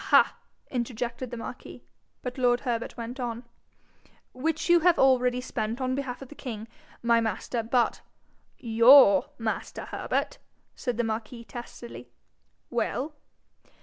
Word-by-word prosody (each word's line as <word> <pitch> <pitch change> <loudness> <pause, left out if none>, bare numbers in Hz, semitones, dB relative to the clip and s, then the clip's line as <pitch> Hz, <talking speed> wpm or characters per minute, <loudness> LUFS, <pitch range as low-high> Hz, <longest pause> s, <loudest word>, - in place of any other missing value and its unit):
ha!' - - +6 0.4
interjected 240 0 -3
the 240 - -6
marquis, 230 - -8 0.4
but 250 +1 -5
lord 245 -1 +3
Herbert 235 -3 -3
went 240 +3 -6
on 240 -1 -3 0.9
'which 315 +5 -1
you 345 0 +6
have 345 +1 +4
already 250 -2 +4
spent 230 -2 -3
on 255 -1 0
behalf 265 -1 -4
of 265 - -13
the - - -10
king, 225 -6 -6 0.4
my 235 0 +4
master, 225 +2 -2
but 235 +1 +1 0.3
' - - -40
'YOUR 235 0 +7
master, 225 -1 -3
Herbert!' - - -2 0.4
said 245 -3 -3
the 240 - +1
marquis, 225 +1 -4
testily. 240 0 -9 0.6
'Well?' 255 +5 -1
245 Hz, 135 wpm, -27 LUFS, 230-255 Hz, 0.9 s, YOUR